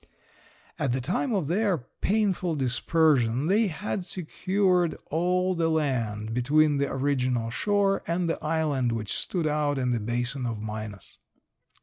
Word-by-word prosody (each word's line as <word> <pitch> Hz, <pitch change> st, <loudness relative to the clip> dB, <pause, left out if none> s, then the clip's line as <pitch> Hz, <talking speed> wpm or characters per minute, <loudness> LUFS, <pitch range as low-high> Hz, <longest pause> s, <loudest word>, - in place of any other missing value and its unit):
At 135 Hz, -5 st, 0 dB
the 130 Hz, -, 0 dB
time 180 Hz, -, -1 dB
of 190 Hz, -9 st, 0 dB
their 195 Hz, +2 st, +1 dB
painful 185 Hz, -, -1 dB
dispersion 130 Hz, -1 st, +2 dB
they 205 Hz, +6 st, +3 dB
had 190 Hz, +2 st, -3 dB
secured 185 Hz, 0 st, 0 dB
all 180 Hz, +3 st, +1 dB
the 165 Hz, -2 st, +1 dB
land 115 Hz, -9 st, -1 dB
between 145 Hz, +5 st, +3 dB
the 140 Hz, 0 st, 0 dB
original 130 Hz, -4 st, 0 dB
shore 200 Hz, -, +1 dB
and 170 Hz, +1 st, 0 dB
the 165 Hz, -, -2 dB
island 150 Hz, -6 st, 0 dB
which 110 Hz, -3 st, -3 dB
stood 175 Hz, -4 st, -2 dB
out 150 Hz, -1 st, +1 dB
in 125 Hz, -1 st, 0 dB
the 120 Hz, -, +1 dB
basin 120 Hz, +4 st, -2 dB
of 115 Hz, -2 st, -3 dB
Minas. 105 Hz, -1 st, -7 dB
150 Hz, 140 wpm, -27 LUFS, 125-180 Hz, -, they